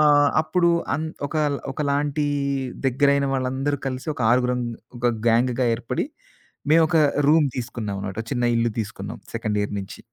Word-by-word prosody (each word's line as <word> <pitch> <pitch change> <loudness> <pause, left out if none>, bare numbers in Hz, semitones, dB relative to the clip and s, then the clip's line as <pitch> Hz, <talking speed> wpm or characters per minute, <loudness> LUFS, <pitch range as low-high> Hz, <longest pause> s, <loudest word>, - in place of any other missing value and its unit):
ఆహ్, 145 -1 +6
అప్పుడు 170 +2 +2 0.3
అన్ 155 +2 -2 0.2
ఒక, - - -10 0.4
ఒకలాంటి 145 +1 0 0.6
దగ్గరైన 140 +2 +3
వాళ్ళందరూ 135 +2 -1
కలిసి 130 +2 -4
ఒక - - -10
ఆరుగురం 125 0 +2 0.4
ఒక 120 - 0 0.2
గ్యాంగ్‌గా 120 +2 +2
ఏర్పడి, 120 - -3 0.7
మేమొక 160 +1 +5 0.3
రూమ్ 155 -1 +5
తీసుకున్నాం 115 -4 -4
అనమాట. 100 +1 -5
చిన్న 120 - 0
ఇల్లు 115 0 +1
తీసుకున్నాం 100 -1 -5 0.2
సెకండ్ 110 -2 -1
ఇయర్ 105 - -3
నించి. 95 0 -8
130 Hz, 135 wpm, -23 LUFS, 115-145 Hz, 0.7 s, ఆహ్